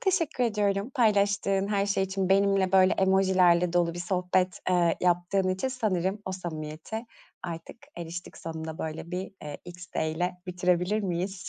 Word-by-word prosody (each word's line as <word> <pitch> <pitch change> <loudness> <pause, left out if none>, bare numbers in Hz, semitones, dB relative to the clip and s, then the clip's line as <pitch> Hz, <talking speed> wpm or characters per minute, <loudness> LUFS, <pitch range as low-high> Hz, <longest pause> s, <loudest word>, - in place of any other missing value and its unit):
teşekkür 340 -9 +1
ediyorum 205 -1 0
paylaştığın 200 -4 +2
her 200 -1 +1
şey 200 -1 +1
için. 190 0 -2
Benimle 195 -1 +3
böyle 190 -1 +6
emojilerle 185 -2 +3
dolu 175 -1 +2
bir - - -6
sohbet, 180 0 0
ııı, 175 -2 +3
yaptığın 180 +2 +1
için. 185 +8 -1
Sanırım 205 -6 -1
o 190 - -4
samimiyete 170 +5 -6 0.4
artık 165 -2 -6 0.2
eriştik 170 +1 -7
sonunda, 160 -1 -6
böyle, 160 +1 -5
bir, 185 +2 -4
eee, 150 -1 -6
XD'yle 175 -1 -3
bitirebilir 180 +3 +1
miyiz? 185 +1 -3
185 Hz, 140 wpm, -28 LUFS, 175-200 Hz, 0.4 s, böyle